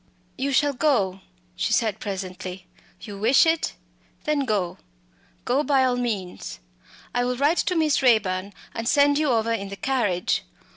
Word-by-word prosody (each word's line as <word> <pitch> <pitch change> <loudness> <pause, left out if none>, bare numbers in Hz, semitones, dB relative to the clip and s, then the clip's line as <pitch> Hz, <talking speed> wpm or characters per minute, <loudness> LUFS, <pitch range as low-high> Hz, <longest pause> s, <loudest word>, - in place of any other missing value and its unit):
"You 275 +1 -1
shall 285 +2 +3
go," 210 -10 +1 0.3
she - - 0
said 220 -4 +1
presently 185 -2 -6 0.4
"you 205 -2 -8
wish 240 +9 +5
it 325 0 +1 0.5
then 300 -2 0
go 200 -7 -1 0.7
go 255 +4 +2
by 280 -3 +3
all 250 -1 +1
means. 200 - -4 0.5
I 245 - +1
will 250 0 -1
write 290 +6 +2
to 360 - 0
Miss 310 -4 +2
Raeburn 200 -6 +2 0.2
and 230 0 -4
send 285 0 +4
you 305 -2 +1
over 230 -2 +1
in 200 -3 -3
the 200 - -6
carriage. 205 -7 0
240 Hz, 155 wpm, -24 LUFS, 195-280 Hz, 0.7 s, wish